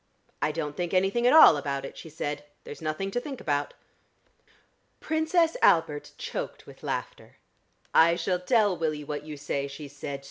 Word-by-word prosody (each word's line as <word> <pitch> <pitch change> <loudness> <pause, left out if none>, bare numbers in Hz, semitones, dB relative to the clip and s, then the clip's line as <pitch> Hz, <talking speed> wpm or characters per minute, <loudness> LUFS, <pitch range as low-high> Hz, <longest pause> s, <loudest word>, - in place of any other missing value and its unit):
"I 155 - +1
don't 150 -1 -4
think 175 +1 -2
anything 195 +6 +2
at 250 - +5
all 310 - +9
about 140 -1 -3
it," - - -9
she 160 - -10
said. 145 -1 -4 0.2
"There's 145 - -9
nothing 160 +5 -3
to 245 - 0
think 270 0 -7
about." 145 -1 -2 1.2
Princess 320 +1 +1
Albert 150 -3 +3
choked - - -5
with - - -14
laughter. - - -5 0.6
"I 170 +1 +6
shall 180 +1 -1
tell 205 0 +2
Willie 155 -3 -2
what 145 0 -4
you 155 -1 -7
say," 140 -1 -3
she 140 +2 -8
said. 140 0 -6
160 Hz, 170 wpm, -27 LUFS, 145-195 Hz, 1.2 s, all